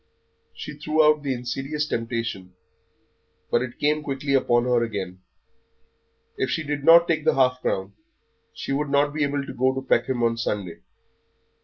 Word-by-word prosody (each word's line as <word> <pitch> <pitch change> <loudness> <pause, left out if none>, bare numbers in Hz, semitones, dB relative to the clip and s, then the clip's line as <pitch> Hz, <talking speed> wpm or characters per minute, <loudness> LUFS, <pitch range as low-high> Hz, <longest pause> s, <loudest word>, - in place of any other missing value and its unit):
She 150 -1 -8
threw 155 +1 +2
out 150 0 +4
the 140 -2 -2
insidious 135 +5 -3
temptation, 115 -8 -4 1.0
but 120 - +3
it 125 -1 -5
came 150 +1 +1
quickly 140 -1 -3
upon 120 -3 +3
her 120 -1 +2
again. 95 -5 -5 1.2
If 130 - -1
she 160 +4 -1
did 145 -1 -3
not 170 +2 +7
take 155 -2 0
the - - +2
half 125 -1 +2
crown 95 +1 -2 0.6
she - - -6
would 145 +1 -1
not 145 +1 +2
be 150 -1 0
able 140 -1 -1
to - - -7
go 130 +1 +1
Peckham 120 0 +1
on 115 0 +1
Sunday. 100 -6 -3
135 Hz, 160 wpm, -24 LUFS, 120-150 Hz, 1.2 s, not